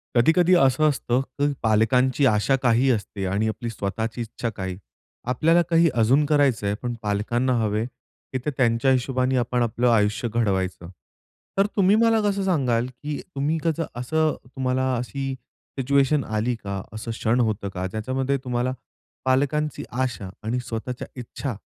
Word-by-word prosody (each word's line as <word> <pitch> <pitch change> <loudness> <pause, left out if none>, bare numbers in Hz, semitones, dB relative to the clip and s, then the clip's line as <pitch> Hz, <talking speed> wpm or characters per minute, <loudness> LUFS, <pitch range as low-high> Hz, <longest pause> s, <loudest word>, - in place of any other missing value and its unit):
कधी-कधी 170 +9 +4
असं 155 0 +4
असतं, 130 -3 0
की 140 +2 -2
पालकांची 125 +5 +3
आशा 110 +3 +3
काही 120 +2 +3
असते 100 -3 -2
आणि 100 +4 0
आपली 115 +2 -3
स्वताःची 110 +2 -3
इच्छा 115 +1 -4
काही. 95 -4 -5 0.5
आपल्याला 160 +7 +3
काही 165 0 +5
अजून 125 +6 +3
करायचंय 135 -9 +2
पण 120 -1 -2
पालकांना 115 +5 0
हवे, 110 0 0
की 130 +1 -10
ते - - +1
त्यांच्या 120 +1 +3
हिशोबाने 130 0 +1
आपण 125 0 0
आपलं 120 +2 +1
आयुष्य 105 0 +2
घडवायचं. 95 -6 -1 0.7
तर 195 - +5
तुम्ही 195 0 +4
मला 225 0 +4
कसं 200 -1 0
सांगाल, 130 -10 +1
की 145 +4 -6 0.2
तुम्ही 145 +4 0
त्याचा 165 0 0
असं 155 +5 +1 0.2
तुम्हाला 130 0 0
अशी 135 +2 -3 0.5
सिच्युएशन 140 +2 +2
आली 110 +3 -1
का? 100 -3 -5
असं 110 +1 -5
क्षण 115 +1 0
होतं 110 -4 0
का? 95 -1 -4
ज्याच्यामध्ये 130 +7 -1
तुम्हाला 125 0 -1 0.5
पालकांची 145 +3 +1
आशा 120 -6 -2
आणि 115 +3 -1
स्वताःच्या 120 +2 -5
इच्छा 125 +1 -5
125 Hz, 145 wpm, -24 LUFS, 110-140 Hz, 0.7 s, काही